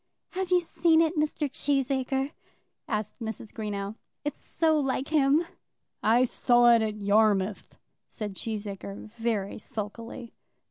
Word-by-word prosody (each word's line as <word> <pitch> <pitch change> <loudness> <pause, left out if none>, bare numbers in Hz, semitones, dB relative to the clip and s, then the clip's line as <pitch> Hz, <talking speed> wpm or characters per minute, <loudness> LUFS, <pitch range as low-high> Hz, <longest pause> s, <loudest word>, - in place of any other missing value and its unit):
"Have 375 -1 -2
you 365 - +5
ever 350 - -1
seen 325 -1 +3
it, 325 +1 +3
Mr. 300 -1 0
Cheesacre?" 270 0 0 0.6
asked 215 0 -3
Mrs. 220 -2 -6
Greenow. 205 -1 -4 0.3
"It's 295 - -3
so 315 -2 +1
like 270 -1 -1
him." 300 +1 +4 0.6
"I 235 +4 +4
saw 240 -1 +5
it 230 - +5
at 215 -1 -1
Yarmouth," 205 -1 +2 0.3
said 210 -2 -5
Cheesacre, 205 0 -6
very 225 -4 -1
sulkily. 225 +3 -6
235 Hz, 130 wpm, -28 LUFS, 210-285 Hz, 0.6 s, you